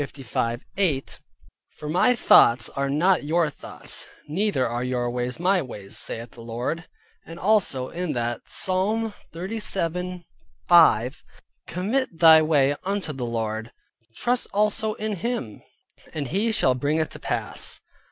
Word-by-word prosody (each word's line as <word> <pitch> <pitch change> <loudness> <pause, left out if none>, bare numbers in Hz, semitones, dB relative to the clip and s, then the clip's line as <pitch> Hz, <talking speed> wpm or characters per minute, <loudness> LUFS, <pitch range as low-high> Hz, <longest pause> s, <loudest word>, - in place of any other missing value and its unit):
8: 155 -9 -1 0.6
"For 150 - -7
my 180 +10 +3
thoughts 120 - +6
are 140 0 -2
not 170 +5 +2
your 160 +1 +1
thoughts, - - -4 0.2
neither 165 -4 0
are 120 +1 -3
your 125 -1 -1
ways 125 +2 -3
my 185 +1 +2
ways, 105 -7 -7
saith 115 +1 -4
the 120 - -12
Lord." 120 +9 -4 0.4
And 165 - -10
also 185 -11 +1
that 135 -9 -2
[in] - - -43
Psalm 210 +4 0 0.2
37.5: 175 - +1 0.4
"Commit 205 +3 -2
thy 160 -1 +8
way 145 -3 +3
unto 195 -5 -2
the 125 -3 -4
Lord; 110 0 -3 0.4
trust 245 - -1
also 210 +1 +1
in 215 -2 -3
him; 230 - -4 0.5
and 145 -5 -3
he 210 +6 +1
shall 130 -11 +2
bring 145 +5 -1
it 160 -1 -1
to - - -10
pass." - - -2
160 Hz, 130 wpm, -24 LUFS, 125-195 Hz, 0.6 s, thy